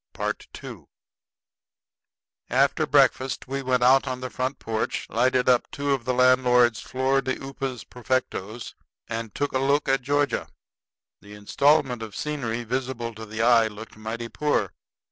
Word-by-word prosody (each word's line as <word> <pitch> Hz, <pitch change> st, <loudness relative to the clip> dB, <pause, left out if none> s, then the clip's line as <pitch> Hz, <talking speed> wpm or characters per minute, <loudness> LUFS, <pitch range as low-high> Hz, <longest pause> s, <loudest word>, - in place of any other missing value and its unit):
II -, -, -5 dB, 1.6 s
After -, -, +2 dB
breakfast 130 Hz, 0 st, +2 dB
we 135 Hz, +1 st, -3 dB
went 125 Hz, -2 st, +1 dB
out 130 Hz, +2 st, +5 dB
on 130 Hz, -1 st, -3 dB
the 130 Hz, -1 st, -6 dB
front 130 Hz, +2 st, -2 dB
porch, 110 Hz, -1 st, -3 dB
lighted 125 Hz, +2 st, +2 dB
up 125 Hz, -1 st, +3 dB
two 140 Hz, 0 st, -2 dB
of 135 Hz, -4 st, 0 dB
the 125 Hz, -, 0 dB
landlord's 125 Hz, -2 st, +4 dB
flor 135 Hz, +1 st, 0 dB
de 130 Hz, -1 st, -2 dB
upas 135 Hz, -2 st, -5 dB
perfectos, 120 Hz, -3 st, -3 dB, 0.3 s
and 115 Hz, -2 st, -5 dB
took 145 Hz, -, -1 dB
a 130 Hz, -, +1 dB
look 140 Hz, +2 st, +1 dB
at 135 Hz, 0 st, +2 dB
Georgia. 145 Hz, +2 st, 0 dB, 0.7 s
The 105 Hz, +1 st, -12 dB
installment 125 Hz, +3 st, +2 dB
of 110 Hz, -2 st, -7 dB
scenery 120 Hz, -6 st, -3 dB
visible 120 Hz, -1 st, -3 dB
to 110 Hz, 0 st, -9 dB
the 110 Hz, +1 st, -2 dB
eye 115 Hz, -2 st, +5 dB
looked 110 Hz, +1 st, -10 dB
mighty 110 Hz, +2 st, -5 dB
poor. 150 Hz, +5 st, -1 dB
125 Hz, 145 wpm, -25 LUFS, 115-135 Hz, 1.6 s, out